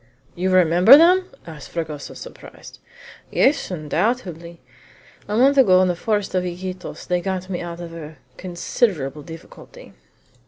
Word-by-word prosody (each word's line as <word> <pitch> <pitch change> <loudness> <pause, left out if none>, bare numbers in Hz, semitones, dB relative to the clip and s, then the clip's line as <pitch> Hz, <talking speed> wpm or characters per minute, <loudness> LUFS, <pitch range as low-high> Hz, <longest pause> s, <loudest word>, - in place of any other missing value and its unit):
"You 185 +2 -2
remember 185 - +6
them!" 365 +3 +4 0.2
asked 155 -4 -11
Fragoso, 155 -3 -6
surprised. - - -13 0.5
"Yes, 280 +3 +1
undoubtedly! 170 0 -3 0.7
A 210 - -2
month 275 +3 +4
ago, 185 -8 +5
in 185 - +1
the 175 - -1
forest 205 +2 -2
of 185 -1 0
Iquitos, 180 +1 -7
they 180 -1 -1
got 190 0 -4
me 175 - -3
out 170 -1 -7
of 170 -1 -8
a 160 -2 -10 0.2
considerable 175 - -2
difficulty." 165 - -13
180 Hz, 140 wpm, -21 LUFS, 170-210 Hz, 0.7 s, remember